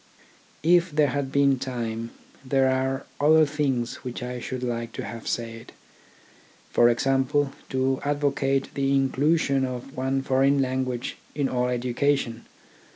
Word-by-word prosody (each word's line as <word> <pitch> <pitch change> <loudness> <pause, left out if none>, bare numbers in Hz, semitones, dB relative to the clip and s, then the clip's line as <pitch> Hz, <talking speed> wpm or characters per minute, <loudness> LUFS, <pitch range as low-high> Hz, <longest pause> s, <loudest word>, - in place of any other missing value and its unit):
If 175 +2 +4
there 150 -2 +2
had 135 0 -2
been 140 -1 +3
time, 115 -3 -4 0.3
there 135 0 +2
are 130 +1 0
other 155 +2 +6
things 140 -5 -1
which 125 -1 -6
I 125 0 -4
should 130 +1 -5
like 115 -1 -3
to - - -5
have 115 -1 -7
said: 115 -1 -4 1.0
for 120 - +5
example, 135 +3 +1 0.2
to 130 0 0
advocate 140 -2 0
the 140 0 +1
inclusion 140 +1 +2
of 130 +1 -5
one 135 +1 -1
foreign 135 +1 +3
language 130 -2 -2 0.2
in 145 -2 +1
all 125 -1 0
education. 125 0 -1
135 Hz, 135 wpm, -25 LUFS, 125-140 Hz, 1.0 s, other